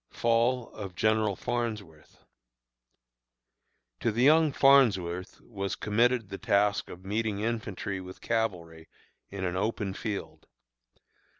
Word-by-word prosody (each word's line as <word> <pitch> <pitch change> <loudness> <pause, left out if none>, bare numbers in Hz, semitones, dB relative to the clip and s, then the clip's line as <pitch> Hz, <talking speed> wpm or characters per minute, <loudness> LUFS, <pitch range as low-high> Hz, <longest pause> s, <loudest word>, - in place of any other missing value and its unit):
FALL 120 +1 +1
OF 95 -4 -8
GENERAL 110 +1 +2
FARNSWORTH. 105 -11 -5 1.8
To 115 - 0
the 120 +3 0
young 155 +2 +5
Farnsworth 100 -11 +3
was 100 -4 -4
committed 115 0 +1
the 95 - -7
task 100 0 +1
of 90 +2 -11
meeting 105 0 -1
infantry 105 -4 -3
with 95 0 -10
cavalry 85 -8 -3 0.4
in 95 -1 -6
an 90 0 -2
open 100 0 -2
field. 105 0 -6
105 Hz, 110 wpm, -28 LUFS, 95-115 Hz, 1.8 s, young